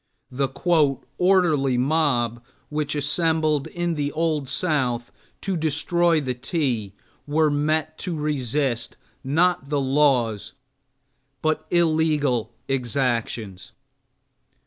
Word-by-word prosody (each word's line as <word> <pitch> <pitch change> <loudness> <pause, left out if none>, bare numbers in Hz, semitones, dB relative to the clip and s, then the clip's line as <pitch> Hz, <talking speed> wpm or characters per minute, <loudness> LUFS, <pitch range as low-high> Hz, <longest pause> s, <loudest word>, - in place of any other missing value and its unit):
the 135 +2 0 0.7
"orderly 165 -9 +3
mob" 125 -4 +1 0.3
which 150 0 -2
assembled 155 0 +1
in 175 -1 -2
the 145 -2 -2
Old 155 -4 -1
South 130 -7 -1 0.3
to 195 - -2
destroy 165 +2 +2
the 130 -3 -2
tea 125 - -2 0.3
were 155 +1 +2
met 155 +2 0
to 180 -4 -3
resist, 135 -4 -1 0.3
not 160 +1 +1
the 145 -1 +1
laws, 130 -6 +1 0.9
but 155 0 0
illegal 155 -8 +2 0.2
exactions. 120 -7 -2
145 Hz, 95 wpm, -23 LUFS, 125-160 Hz, 0.9 s, orderly